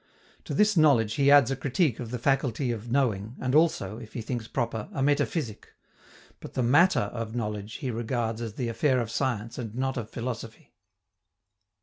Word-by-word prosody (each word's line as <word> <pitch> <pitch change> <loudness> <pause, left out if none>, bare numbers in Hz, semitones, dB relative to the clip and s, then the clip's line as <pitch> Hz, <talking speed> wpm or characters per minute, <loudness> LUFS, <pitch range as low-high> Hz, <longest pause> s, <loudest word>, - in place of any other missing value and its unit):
To - - -4
this 210 0 +4
knowledge 135 -10 +4
he 140 +2 +3
adds 140 -3 +6
a - - +1
critique 135 - 0
of 120 -3 -5
the 125 - -3
faculty 130 -1 0
of 115 0 -5
knowing, 115 -4 0
and 130 0 -1
also, 140 - +2
if 115 -2 -11
he 115 - -4
thinks 120 -1 -4
proper, 115 -4 -3
a 135 - -1
metaphysic; 145 -4 -1 0.6
but - - -11
the 130 - +1
matter 140 - +4
of 115 -1 -5
knowledge 105 -2 -4
he 130 -4 -3
regards 115 0 -2
as 115 -3 -4
the 125 - -2
affair 130 +3 +1
of 115 -2 -3
science 115 -4 -2
and 115 -3 -6
not 130 +1 -1
of 110 -3 -4
philosophy. 115 -2 -6
120 Hz, 185 wpm, -27 LUFS, 115-135 Hz, 0.6 s, adds